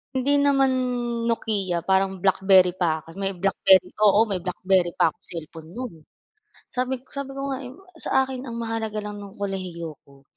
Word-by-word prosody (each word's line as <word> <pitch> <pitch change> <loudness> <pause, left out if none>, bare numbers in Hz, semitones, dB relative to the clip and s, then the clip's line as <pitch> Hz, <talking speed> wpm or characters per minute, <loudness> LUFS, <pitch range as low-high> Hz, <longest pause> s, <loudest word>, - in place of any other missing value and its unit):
Hindi 275 +3 +3
naman 275 -1 +4 0.6
Nokia 205 -6 0
parang 190 0 +2
BlackBerry 190 -1 +4
pa 165 -4 +1
ako, 165 +3 -15
may 195 0 -1
BlackBerry, 190 0 +4 0.2
oo, 205 0 +6
may 185 -4 -3
BlackBerry 185 -1 +1
pa - - +3
akong - - -6
cellphone 160 -1 -8
no'n. 245 -3 -6 0.8
Sabi 255 0 -2
sabi 280 -1 -5
ko 275 0 -3
nga, 265 - -2
eh, 250 - -9 0.2
sa 265 - +2
akin 265 0 -5
ang 235 - -6
mahalaga 225 -2 -3
lang 210 0 -6
no'ng 200 -1 -10
kolehiyo 180 -5 -5
'ko 140 -1 -20
195 Hz, 170 wpm, -24 LUFS, 180-240 Hz, 0.8 s, oo